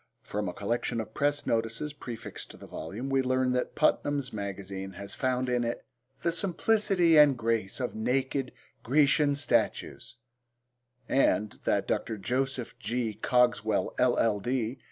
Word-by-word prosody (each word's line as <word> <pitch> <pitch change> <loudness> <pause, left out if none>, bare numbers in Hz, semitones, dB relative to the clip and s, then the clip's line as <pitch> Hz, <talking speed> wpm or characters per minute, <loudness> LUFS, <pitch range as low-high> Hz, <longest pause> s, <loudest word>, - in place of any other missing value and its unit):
From 105 -2 -3
a - - -6
collection 115 +2 -1
of 110 - -5
press 145 0 0
notices 115 +6 -1
prefixed 120 -5 -8
to - - -11
the - - -11
volume 100 +12 -6
we 135 0 +3
learn 130 0 +1
that 125 0 -1
Putnam's 145 -3 +1
Magazine 100 -1 -5
has 100 +2 -8
found 130 0 0
in 125 -1 +1
it 120 0 -3 0.4
'the 170 - +2
simplicity 180 -1 +3
and 145 -3 +6
grace 115 -3 -1
of 125 - -2
naked 130 +3 -1 0.3
Grecian 145 +2 +3
statues,' 145 - 0 0.9
and 110 -6 +2
that - - +1
Dr. 110 - -1
Jos. 130 +4 -2
G. 115 0 -1
Cogswell, 120 -3 +1
LL.D. 120 0 +1
125 Hz, 135 wpm, -29 LUFS, 110-135 Hz, 0.9 s, and